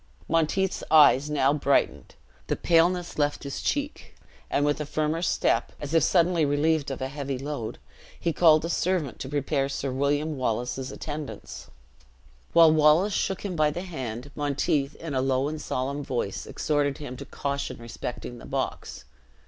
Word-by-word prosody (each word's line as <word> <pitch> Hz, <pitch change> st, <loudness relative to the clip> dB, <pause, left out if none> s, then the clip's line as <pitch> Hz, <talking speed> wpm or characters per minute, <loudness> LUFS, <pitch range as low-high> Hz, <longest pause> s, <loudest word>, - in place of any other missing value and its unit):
Monteith's 165 Hz, +4 st, +1 dB
eyes 150 Hz, -2 st, +6 dB
now 140 Hz, -2 st, +2 dB
brightened 140 Hz, -1 st, 0 dB, 0.3 s
the -, -, 0 dB
paleness 170 Hz, 0 st, +2 dB
left 145 Hz, 0 st, 0 dB
his 140 Hz, -1 st, -5 dB
cheek 290 Hz, 0 st, -3 dB, 0.3 s
and 145 Hz, -, +1 dB
with 145 Hz, +1 st, 0 dB
a -, -, -2 dB
firmer 155 Hz, +2 st, -1 dB
step, 180 Hz, -, +1 dB
as 145 Hz, +1 st, -6 dB
if 165 Hz, -, +5 dB
suddenly 170 Hz, +1 st, +3 dB
relieved 150 Hz, +1 st, +1 dB
of 135 Hz, -1 st, -4 dB
a -, -, -1 dB
heavy 135 Hz, -1 st, -4 dB
load, 135 Hz, -5 st, -5 dB, 0.4 s
he 170 Hz, -, 0 dB
called 155 Hz, -2 st, +5 dB
a -, -, -3 dB
servant 170 Hz, -, -1 dB
to 130 Hz, -, -5 dB
prepare 140 Hz, -1 st, 0 dB
Sir 135 Hz, -1 st, -3 dB
William 145 Hz, +3 st, 0 dB
Wallace's 125 Hz, +1 st, -2 dB
attendants. 150 Hz, -1 st, -7 dB, 0.8 s
While 165 Hz, -1 st, +7 dB
Wallace 155 Hz, +6 st, +4 dB
shook 195 Hz, +1 st, -1 dB
him 185 Hz, -3 st, -3 dB
by 155 Hz, -2 st, +3 dB
the 175 Hz, +5 st, -4 dB
hand, 130 Hz, -6 st, -6 dB
Monteith, 145 Hz, 0 st, 0 dB
in 165 Hz, -3 st, -6 dB
a 130 Hz, -, +1 dB
low 135 Hz, +1 st, +1 dB
and 155 Hz, +1 st, -4 dB
solemn 140 Hz, +2 st, -3 dB
voice, 120 Hz, -8 st, -3 dB
exhorted 145 Hz, -2 st, 0 dB
him 145 Hz, -4 st, -7 dB
to -, -, -8 dB
caution 140 Hz, 0 st, -4 dB
respecting 120 Hz, +1 st, -7 dB
the -, -, -11 dB
box. -, -, -4 dB
145 Hz, 165 wpm, -26 LUFS, 135-160 Hz, 0.8 s, While